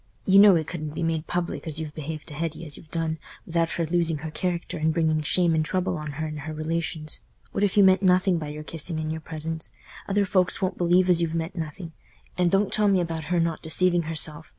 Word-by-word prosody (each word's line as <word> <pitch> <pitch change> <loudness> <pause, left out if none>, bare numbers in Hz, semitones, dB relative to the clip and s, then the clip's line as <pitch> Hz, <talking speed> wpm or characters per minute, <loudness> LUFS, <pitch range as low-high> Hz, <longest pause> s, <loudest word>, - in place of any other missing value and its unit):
You 195 +1 +6
know 200 -2 +8
it 160 -2 +1
couldn't 155 -2 -5
be 170 - -2
made 165 -1 -1
public 175 -1 -3
as 155 -1 -3
you've 155 -2 -5
behaved 155 0 -6
to - - -9
Hetty 165 +2 -4
as 150 - -6
y' - - -9
have 160 - -20
done 160 -1 -2 0.3
without 165 0 0
her 170 - -1
losing 165 -1 0
her 155 - -4
character 175 0 -3
and 160 +1 +2
bringing 160 -1 +1
shame 170 +2 +3
and 160 -1 +2
trouble 185 +3 -1
on 150 -2 -5
her 155 +3 -3
and 155 -1 -5
her 155 +2 -6
relations. 155 0 -2 0.3
What 200 - -1
if 205 0 +1
you 200 - +8
meant 190 0 +5
nothing 185 -1 +3
by 155 - -5
your 150 +1 -6
kissing 160 +1 -3
and 155 0 -2
your 160 0 -4
presents? 160 0 -5 0.4
Other 200 0 +2
folks 185 -2 +2
won't 185 -1 -2
believe 180 +1 +4
as 175 -2 +4
you've 165 -1 -1
meant 165 +2 -3
nothing; 165 +1 -6 0.4
and 180 -1 +2
don't 195 +2 +2
tell 210 -1 +3
me 195 -2 +4
about 165 -2 -3
her 175 +2 +1
not 165 -1 0
deceiving 175 +2 +2
herself. 155 -1 -3
165 Hz, 245 wpm, -25 LUFS, 155-180 Hz, 0.4 s, know